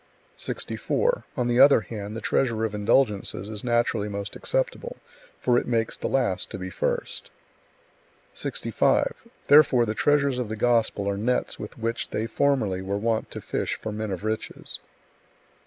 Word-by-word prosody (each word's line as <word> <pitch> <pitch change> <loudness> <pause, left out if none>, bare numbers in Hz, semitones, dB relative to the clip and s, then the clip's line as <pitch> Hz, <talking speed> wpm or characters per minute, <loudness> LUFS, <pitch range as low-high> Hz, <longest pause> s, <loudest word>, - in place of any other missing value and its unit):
64. - - -1
On 125 -2 +1
the 120 0 +2
other 140 -3 +8
hand, 105 +1 -6
the - - -6
treasure 115 -4 +1
of 110 - -3
indulgences 105 -2 +1
is 105 -1 -5
naturally 120 -3 +1
most 100 0 -5
acceptable, - - -2 0.4
for 125 -1 +3
it - - -7
makes 115 -2 0
the - - -3
last 120 -9 0
to - - -6
be 95 0 -6
first. - - -2 1.0
65. - - +1 0.3
Therefore 140 -5 +6
the 110 - -1
treasures 140 0 +2
of 120 -4 -3
the 110 - -3
Gospel 115 -3 +1
are 100 0 0
nets 125 +4 -1
with 105 - -8
which 115 0 -2
they 110 - -2
formerly 115 -6 +1
were 100 +1 -2
wont 110 +1 -1
to - - -7
fish - - -2
for 110 - -6
men 110 0 -3
of 95 0 -4
riches. 110 0 -3
115 Hz, 160 wpm, -25 LUFS, 105-125 Hz, 1.0 s, other